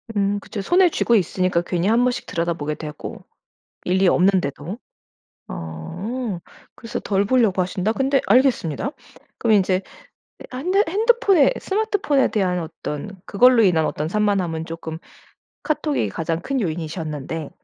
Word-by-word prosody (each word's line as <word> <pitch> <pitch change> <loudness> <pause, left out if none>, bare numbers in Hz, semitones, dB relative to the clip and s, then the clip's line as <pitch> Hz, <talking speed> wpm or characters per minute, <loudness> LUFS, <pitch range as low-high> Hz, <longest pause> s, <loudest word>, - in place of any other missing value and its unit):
음 200 0 +1
그쵸. 200 0 -6
손에 355 - +4
쥐고 235 -6 +2
있으니까 185 -2 +1
괜히 175 +1 -1
한 230 +3 +4
번씩 250 -1 -1
들여다보게 165 -3 -2
되고 150 -1 -8 0.6
일이 190 +1 +2
없는데도. 180 -1 +1 0.7
어 180 - -5 0.4
그래서 230 0 -5
덜 200 0 +1
보려고 215 -5 +3
하신다 185 +3 -1
근데 270 +3 +1
알겠습니다. 245 - +2 0.5
그럼 225 -2 +3
인제 190 -1 +2 0.7
아 255 - -6
한대 365 +9 +2
핸드폰에 410 - +4
스마트폰에 400 -9 +1
대한 185 -4 0
어떤 165 +3 -6
그걸로 245 +3 +5
인한 165 -5 +3
어떤 150 - -2
산만함은 185 -4 0
조금 165 -1 -6 0.7
카톡이 300 -2 0
가장 165 0 -2
큰 275 +5 -2
요인이셨는데 160 - -4
195 Hz, 315 characters per minute, -22 LUFS, 165-250 Hz, 0.7 s, 그걸로